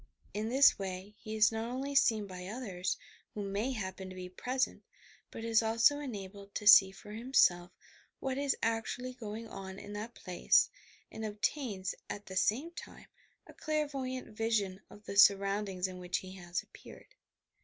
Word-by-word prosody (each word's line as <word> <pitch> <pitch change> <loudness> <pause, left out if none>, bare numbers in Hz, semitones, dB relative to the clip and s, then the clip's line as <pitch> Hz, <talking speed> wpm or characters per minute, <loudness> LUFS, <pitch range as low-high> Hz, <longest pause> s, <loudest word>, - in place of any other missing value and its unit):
In 215 +2 -2
this 270 -1 +6
way 190 +1 -5
he 215 0 -6
is 220 +1 +5
not 225 +1 -3
only 270 +3 -3
seen 220 -6 +4
by 180 -2 -8
others, 195 -5 -3 0.4
who 210 - -3
may 200 +6 -1
happen 190 -4 -5
to 185 - -9
be 180 0 -7
present, 255 +7 -1 0.5
but 225 - -8
is 225 -1 +3
also 230 +6 +4
enabled 200 -6 -7
to 210 - -3
see 200 -2 +9
for 205 +2 -12
himself 210 -7 +3 0.5
what 265 -1 -2
is 280 0 0
actually 230 +3 -1
going 225 -2 -7
on 195 -3 -8
in 205 +1 -9
that 215 +3 -6
place, 180 - +3 0.4
and 220 - -7
obtains, 210 -2 -2 0.2
at 205 - -6
the 190 - -8
same 255 - +1
time, 345 - -11 0.4
a - - -14
clairvoyant 275 -6 -3
vision 210 -4 0
of 210 0 -15
the 200 - -5
surroundings 195 -1 +4
in 185 -1 -8
which 180 0 -1
he 185 - -8
has 175 -2 -4
appeared. - - -15
210 Hz, 165 wpm, -33 LUFS, 190-245 Hz, 0.5 s, see